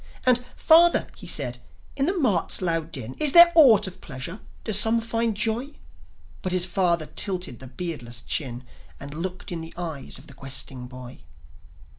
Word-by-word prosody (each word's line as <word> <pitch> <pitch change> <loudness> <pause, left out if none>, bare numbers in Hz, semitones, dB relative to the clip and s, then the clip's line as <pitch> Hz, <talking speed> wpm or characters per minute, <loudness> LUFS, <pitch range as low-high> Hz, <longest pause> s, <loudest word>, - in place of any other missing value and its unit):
And, 250 -1 +3
"Father," 340 +2 +5
he - - -11
said, - - -3 0.4
"in 275 +1 0
the 375 +2 -1
mart's 215 - 0
loud 165 -3 -2
din 130 -4 -6
Is 300 -3 +3
there 345 0 +10
aught 275 - +6
of 185 -1 -9
pleasure? 150 - -7 0.2
Do 220 - -2
some 225 +3 +7
find 230 -1 -2
joy?" 230 +6 -2 0.7
But 185 - -3
his 180 -1 +1
father 175 -3 0
tilted 180 - -2
the 130 - -11
beardless 125 -5 -6
chin, 125 -4 -3 0.4
And 140 +1 -9
looked 180 +4 -6
in 170 -2 -5
the 160 0 -10
eyes 160 -6 -6
of 130 - -15
the 140 - -13
questing 135 -1 -5
boy. 125 0 -11
180 Hz, 170 wpm, -24 LUFS, 135-230 Hz, 0.7 s, there